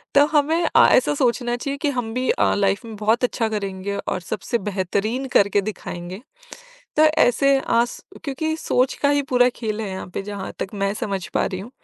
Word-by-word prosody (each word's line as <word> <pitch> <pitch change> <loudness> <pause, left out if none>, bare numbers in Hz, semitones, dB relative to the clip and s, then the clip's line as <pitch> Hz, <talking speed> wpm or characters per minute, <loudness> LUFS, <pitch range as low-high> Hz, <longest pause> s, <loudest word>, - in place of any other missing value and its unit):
तो 285 +1 +7
हमें 315 +3 +3
अ, - - +8
ऐसा 255 - +4
सोचना 240 -2 +1
चाहिए 275 +3 -4
कि 295 - +1
हम 245 -5 -3
भी 255 +1 -1
अ, - - +2
लाइफ 200 +3 +1
में 225 -1 -8
बहुत 220 +4 +1
अच्छा 235 -2 +1
करेंगे 200 -1 -3
और 185 - -2
सबसे 220 +6 -3
बेहतरीन 205 +6 -1
करके 200 0 +3
दिखाएँगे। 185 -2 -6 0.8
तो 305 - +5 0.2
ऐसे 275 +3 +4 0.2
आस 235 +1 +1 0.2
क्योंकि 315 +3 -2
सोच 255 -4 +1
का 285 - +4
ही 285 0 +2
पूरा 250 0 +5
खेल 220 -2 -3
है 205 -3 -4
यहाँ 190 - -6
पर - - -2
जहाँ 200 -1 -6
तक - - -3
मैं 195 0 0
समझ 195 -4 -3
पा - - +2
रही 185 -1 -4
हूँ 215 +5 -9
225 Hz, 200 wpm, -22 LUFS, 200-260 Hz, 0.8 s, अ